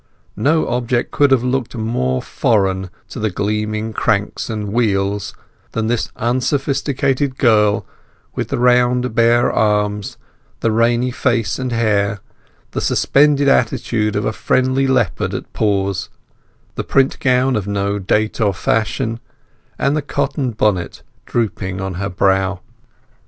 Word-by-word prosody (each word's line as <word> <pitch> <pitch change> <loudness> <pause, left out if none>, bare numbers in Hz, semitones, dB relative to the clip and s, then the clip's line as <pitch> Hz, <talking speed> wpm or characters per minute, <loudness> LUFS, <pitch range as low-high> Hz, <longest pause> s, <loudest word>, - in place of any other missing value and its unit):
No 155 +3 +2
object 120 0 -1
could 145 -1 +3
have 130 -3 +3
looked 125 -1 -1
more 110 - -1
foreign 95 -3 0 0.2
to - - -7
the 110 0 0
gleaming 105 +3 -2
cranks 105 0 -1
and 105 -2 -4
wheels 100 -3 0 0.4
than 115 - -1
this 115 0 -1
unsophisticated 135 +2 0
girl, 105 -4 +3 0.5
with - - -3
the - - -2
round 125 0 +3
bare 120 +1 +3
arms, 105 -1 0 0.4
the 115 - +1
rainy 120 +3 +2
face 120 -5 0
and 130 -1 -3
hair, 100 -3 +1 0.5
the - - -3
suspended 145 0 +3
attitude 110 -4 +1
of 105 0 -1
a - - 0
friendly 130 +3 +1
leopard 130 -1 0
at - - -7
pause, 100 -2 0 0.6
the - - -4
print 135 -1 +1
gown 130 0 +2
of 105 -2 -2
no 100 0 -1
date 105 +4 0
or 100 -3 +2
fashion, 115 +3 -1 0.6
and 140 +2 +1
the 155 - 0
cotton 140 -2 -2
bonnet 105 -5 -1 0.2
drooping 95 -5 -2
on 95 -1 -3
her 100 - -2
brow. 95 0 +1
115 Hz, 135 wpm, -18 LUFS, 100-125 Hz, 0.6 s, could